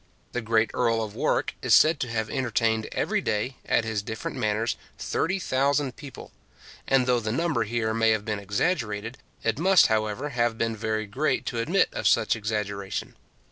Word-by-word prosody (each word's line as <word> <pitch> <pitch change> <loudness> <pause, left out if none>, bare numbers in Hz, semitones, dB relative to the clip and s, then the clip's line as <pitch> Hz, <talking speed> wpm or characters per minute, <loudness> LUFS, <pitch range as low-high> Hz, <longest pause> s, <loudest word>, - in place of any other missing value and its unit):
The 125 - -2
great 110 0 +2
Earl 115 -2 +1
of 105 -2 -6
Warwick - - 0
is - - +5
said 155 -1 +5
to 125 - -2
have 110 -1 -1
entertained 115 -3 0
every - - 0
day, 110 +5 -2
at - - +2
his 110 -2 -1
different 110 +2 -5
manors, 110 +2 0 0.2
30,000 140 -6 0
people; 145 -4 -10 0.6
and 135 -2 +3
though 125 -1 +2
the 110 -1 -3
number 145 -2 0
here 110 0 -1
may 115 0 +3
have 110 -2 +1
been 105 -2 -2
exaggerated, 105 - -2 0.2
it - - 0
must, 190 +1 +6
however, 110 +6 -1
have 120 -3 0
been 115 0 -1
very 110 0 -2
great 130 +10 -1
to 120 - -3
admit 170 +12 +2
of - - 0
such 115 0 +3
exaggeration. 105 -3 -3
115 Hz, 175 wpm, -26 LUFS, 110-130 Hz, 0.6 s, must